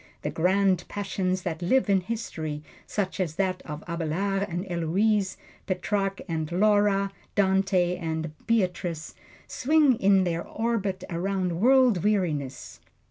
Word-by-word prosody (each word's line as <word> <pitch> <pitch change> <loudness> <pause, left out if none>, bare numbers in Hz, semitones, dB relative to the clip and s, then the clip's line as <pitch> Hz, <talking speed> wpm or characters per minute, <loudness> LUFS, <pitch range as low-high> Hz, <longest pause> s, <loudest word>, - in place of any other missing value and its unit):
The - - -2
Grand 185 +1 +2
Passions 185 -2 -2
that 165 -1 -3
live 255 +10 +2
in 195 -2 +3
history, 160 -8 -4 0.2
such 195 -2 -2
as 165 -5 -1
that 185 0 -1
of 150 0 -6
Abelard 175 +4 -1
and 175 +2 -3
Heloise, 190 +4 +1 0.3
Petrarch 195 +1 -1
and 160 -2 -3
Laura, 200 +1 +3 0.2
Dante 190 -2 +2
and 160 -2 -3 0.2
Beatrice, 180 -7 -1 0.3
swing 290 -3 +3
in 195 -1 +4
their 170 -2 -1
orbit 205 -5 -2
around 180 0 -1
world 250 -5 +4
weariness. 160 -10 -1
190 Hz, 125 wpm, -26 LUFS, 170-205 Hz, 0.3 s, in